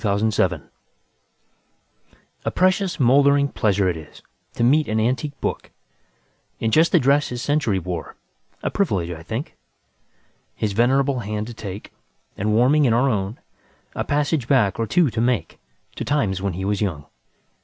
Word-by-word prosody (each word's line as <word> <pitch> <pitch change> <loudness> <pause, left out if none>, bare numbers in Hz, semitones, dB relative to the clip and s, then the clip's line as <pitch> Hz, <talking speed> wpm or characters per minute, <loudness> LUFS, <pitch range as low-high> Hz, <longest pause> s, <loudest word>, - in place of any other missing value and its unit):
Part 100 -2 +1
One: 110 0 +2
Life - - +3
X - - -9 1.8
A - - 0
PRECIOUS, 185 0 +1
mouldering 140 +2 +4
pleasure 100 -7 +1
't - - -8
isTo 80 +8 -9
meet 150 +5 +3
an 110 +1 0
antique 130 +5 -1
book, - - -3 0.9
In 110 - 0
just 160 +7 +4
the - - +5
dress 140 +3 +3
his 125 0 -5
century 145 -9 +1
wore;A 90 -2 -7
privilege, 95 - 0
I 80 -2 -7
think, 110 - -5 1.0
His 105 -2 -2
venerable 130 +4 +2
hand 105 -1 -3
to 120 - -8
take, 100 -2 -8 0.4
And 105 +2 -1
warming 140 +6 +4
in 120 - +3
our 125 +3 +3
own,A 100 +1 -6
passage 145 -3 0
back, 120 -9 +2
or 115 - 0
two, 160 - +2
to 110 - -2
makeTo 120 -9 -4
times 105 -11 0
when 100 -2 -2
he 95 +3 -4
was 100 0 -1
young. 85 -8 -2
115 Hz, 155 wpm, -22 LUFS, 100-140 Hz, 1.8 s, the